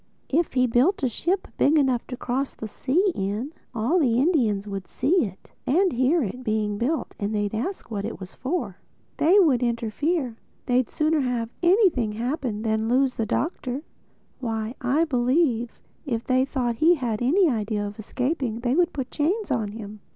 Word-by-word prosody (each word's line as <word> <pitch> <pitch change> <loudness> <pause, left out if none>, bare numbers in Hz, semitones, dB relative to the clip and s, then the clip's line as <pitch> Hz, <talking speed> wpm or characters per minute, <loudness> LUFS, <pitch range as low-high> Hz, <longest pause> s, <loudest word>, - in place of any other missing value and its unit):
If 330 +4 +1
he 255 -1 +3
built 255 - +2
a - - +4
ship 365 - -1
big 305 +3 +4
enough 260 -5 +1
to 250 - -6
cross 260 +3 -2
the 220 - -6
sea 340 - +1
in, 210 +7 -3 0.2
all 240 +11 +2
the 240 -7 +2
Indians 245 - +2
would 195 -2 -5
see 300 +4 +2
it, 190 -1 -11 0.2
and 360 +6 +3
hear 260 +6 +2
it, 250 +5 -5
being 215 -2 -1
built; 295 +7 -1
and 205 +1 -2
they'd 205 0 -1
ask 245 - -4
what 200 -2 -2
it 225 - -5
was 190 -1 -9
for. 255 - -3 0.4
They 345 +6 +5
would 285 -10 +4
interfere. 240 +3 -1 0.3
They'd 250 -1 +2
sooner 310 0 +1
have 245 -4 -1
anything 345 - +3
happen 235 -2 -2
than 220 0 0
lose 260 +1 +3
the 225 -3 -2
Doctor. 270 - -2 0.6
Why, 225 -2 -3
I 275 +6 +2
believe 250 -3 +1 0.2
if 235 -5 -3
they 255 0 +3
thought 245 -4 -2
he 335 +5 +5
had 240 -7 -2
any 340 +10 +4
idea 215 -5 -1
of 205 +1 -7
escaping 250 0 -2
they 245 0 +1
would 350 +3 +2
put 265 -3 -4
chains 365 +5 0
on 225 -5 0
him." 215 -1 -8
250 Hz, 180 wpm, -25 LUFS, 225-305 Hz, 0.6 s, They